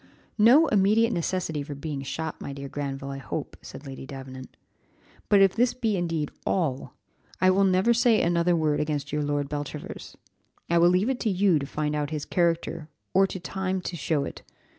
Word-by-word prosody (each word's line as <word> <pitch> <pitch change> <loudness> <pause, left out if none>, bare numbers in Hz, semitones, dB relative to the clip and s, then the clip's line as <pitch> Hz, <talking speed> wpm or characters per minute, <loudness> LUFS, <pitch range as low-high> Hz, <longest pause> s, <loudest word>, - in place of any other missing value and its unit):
"No 250 +9 +7
immediate 215 +3 +3
necessity 170 -3 -2
for 145 0 -6
being 145 -1 -5
shot, 160 +3 -5
my 140 - -5
dear 140 0 -7
Granville, 140 -1 -5
I 135 - -6
hope," 135 - -5
said 140 - -11
Lady 135 -1 -8
Davenant. 130 -1 -9 0.7
"But 200 -1 +6
if 195 -1 +5
this 240 +2 +2
be 225 -4 0
indeed 165 -4 -2
all, 155 -9 -1 0.5
I 185 0 +5
will 195 +1 +3
never 190 +5 +3
say 235 -2 +4
another 170 0 +2
word 155 -2 +1
against 145 -2 -2
your 150 - 0
Lord 145 -1 -1
Beltravers; 145 0 -6 0.5
I 170 - +4
will 170 +1 +6
leave 185 +6 +2
it 260 -1 -1
to 225 - 0
you 190 -4 +3
to 140 - -5
find 150 0 -2
out 145 -1 -1
his 155 -2 -4
character, 170 -2 -1 0.2
or 195 +1 +5
to 190 - -6
time 190 +2 -3
to 180 - -5
show 155 -2 0
it. - - -8
165 Hz, 190 wpm, -26 LUFS, 145-190 Hz, 0.7 s, No